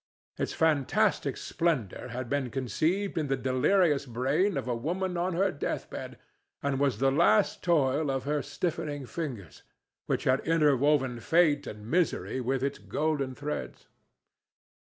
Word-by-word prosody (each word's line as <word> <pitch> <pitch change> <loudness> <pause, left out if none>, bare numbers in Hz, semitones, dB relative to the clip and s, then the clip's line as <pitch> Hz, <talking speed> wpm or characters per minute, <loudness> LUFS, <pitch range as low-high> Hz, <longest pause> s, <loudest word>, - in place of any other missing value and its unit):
Its - - -1
fantastic 155 -5 +1
splendor 155 - -1
had 125 +1 -5
been 140 -1 -1
conceived 155 - -1
in 150 - -1
the 135 0 0
delirious 140 +3 +2
brain 135 - +1
of - - -3
a 125 - 0
woman 180 +9 -2
on 175 +1 -1
her 195 +2 +2
death 145 - -4
bed - - -7 0.5
and 140 -1 0
was 140 -3 +1
the 135 +1 +2
last 110 -6 +3
toil 145 -3 +2
of 135 -1 -1
her 145 +1 0
stiffening 145 -1 -3
fingers, 120 - -6 0.5
which - - 0
had 130 +1 +3
interwoven 145 -5 +2
fate 145 +1 +3
and 105 0 -8
misery 160 -2 0
with 130 +1 -1
its 140 - -2
golden 135 +5 -1
threads. 140 - -5
140 Hz, 145 wpm, -29 LUFS, 130-160 Hz, 0.5 s, last